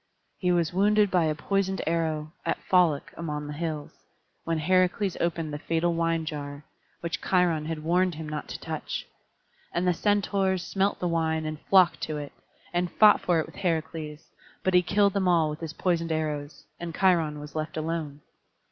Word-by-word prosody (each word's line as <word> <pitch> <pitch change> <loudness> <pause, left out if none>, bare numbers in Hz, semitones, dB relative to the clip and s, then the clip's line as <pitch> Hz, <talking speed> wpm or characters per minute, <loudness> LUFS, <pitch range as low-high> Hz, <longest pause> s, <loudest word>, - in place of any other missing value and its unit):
He 180 -1 +2
was 170 -2 +1
wounded 205 +1 +3
by 175 -3 +3
a 155 -1 0
poisoned 190 +4 -1
arrow, 160 -1 -1
at - - 0
Pholoc 175 -6 +2
among 150 -3 -4
the 150 - -5
hills, 155 -1 -4 0.5
when 165 -1 0
Heracles 185 +3 +2
opened 165 -2 -1
the 145 - -4
fatal 165 +2 0
wine 165 -1 0
jar, 145 -2 -6 0.4
which 170 0 -3
Cheiron 170 -4 +2
had 160 -1 -4
warned 180 +1 +2
him 155 0 -6
not 150 -1 -5
to - - -6
touch. - - -4 0.7
And 175 +1 0
the 180 - +4
Centaurs 195 -1 +1
smelt 195 +1 0
the 180 - -1
wine, 160 -2 0
and 155 -1 -4
flocked 185 -3 +5
to 155 - -3
it, 145 -1 -6 0.4
and 175 0 0
fought 215 -1 +6
for 175 -2 +2
it 160 - -1
with - - -14
Heracles; 160 -3 -2 0.4
but 185 - +1
he 180 - +7
killed 200 +3 +2
them 195 -2 +1
all 165 -3 +3
with 150 - -6
his 160 -1 -5
poisoned 170 -2 0
arrows, 150 -2 -3 0.2
and 170 -1 -5
Cheiron 165 -6 +2
was 150 -1 -9
left 155 0 -4
alone. 155 -2 -3
165 Hz, 185 wpm, -27 LUFS, 155-180 Hz, 0.7 s, he